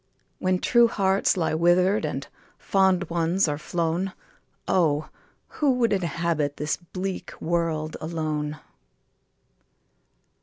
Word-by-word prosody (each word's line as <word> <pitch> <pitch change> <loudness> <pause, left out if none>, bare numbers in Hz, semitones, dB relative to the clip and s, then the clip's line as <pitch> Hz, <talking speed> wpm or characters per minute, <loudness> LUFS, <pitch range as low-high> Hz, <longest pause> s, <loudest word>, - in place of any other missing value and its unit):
When 185 0 +1
true 235 +5 +4
hearts 195 -3 +1
lie 165 -3 0
wither'd, 180 +5 +3
And - - -3 0.3
fond 190 -1 +2
ones 170 +2 +2
are 145 -1 -2
flown, 175 +4 -1 0.5
Oh! 155 -5 +2 0.4
who 285 -3 +1
would 240 -3 +2
inhabit 170 -5 -1
This 150 +1 -1
bleak 185 +2 -6
world 160 -2 -1
alone 155 -2 -3
170 Hz, 105 wpm, -25 LUFS, 155-190 Hz, 0.5 s, true